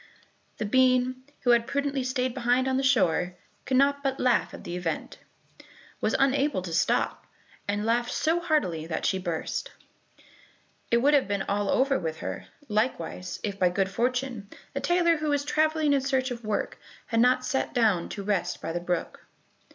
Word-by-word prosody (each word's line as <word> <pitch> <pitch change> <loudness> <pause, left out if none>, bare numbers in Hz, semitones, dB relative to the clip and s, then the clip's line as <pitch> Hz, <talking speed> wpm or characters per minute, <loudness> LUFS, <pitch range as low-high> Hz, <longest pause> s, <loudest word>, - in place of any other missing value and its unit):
The 215 - -2
bean, 255 +2 +3 0.2
who 245 - +3
had 235 0 +3
prudently 280 -1 -1
stayed 255 -1 -1
behind 250 +1 +1
on 260 - +1
the - - +1
shore, 185 -9 +2 0.3
could 260 - +1
not 280 +1 +3
but 270 -1 -1
laugh 250 -2 +2
at - - -10
the 175 - -5
event, 175 -3 -4 0.8
was - - +1
unable 275 -6 +2
to 170 -3 -5
stop, 165 - 0 0.4
and 205 +1 -1
laughed 240 +1 +1
so 325 +2 +1
heartily 295 - 0
that 160 - -3
she 190 - +1
burst. 175 - -3 1.2
It 235 +1 +3
would 290 +2 +5
have 280 -6 +4
been 200 -1 -1
all 205 0 -1
over 270 +1 +2
with 160 -2 -3
her, - - -5 0.2
likewise, 210 -5 -2
if, 200 -2 -3
by 180 - +4
good 190 +2 0
fortune, 245 -1 -1 0.2
a - - -2
tailor 345 -1 +3
who 305 0 -2
was 285 -1 +1
traveling 310 -1 +2
in 275 - +3
search 265 -1 0
of 240 -1 -6
work, 215 -1 -2 0.3
had 230 - 0
not 255 +1 +4
sat 265 - -1
down 215 -9 +2
to 200 - -5
rest 200 -2 -1
by 165 - -4
the 175 - -2
brook. 175 -1 -3
245 Hz, 180 wpm, -27 LUFS, 195-270 Hz, 1.2 s, would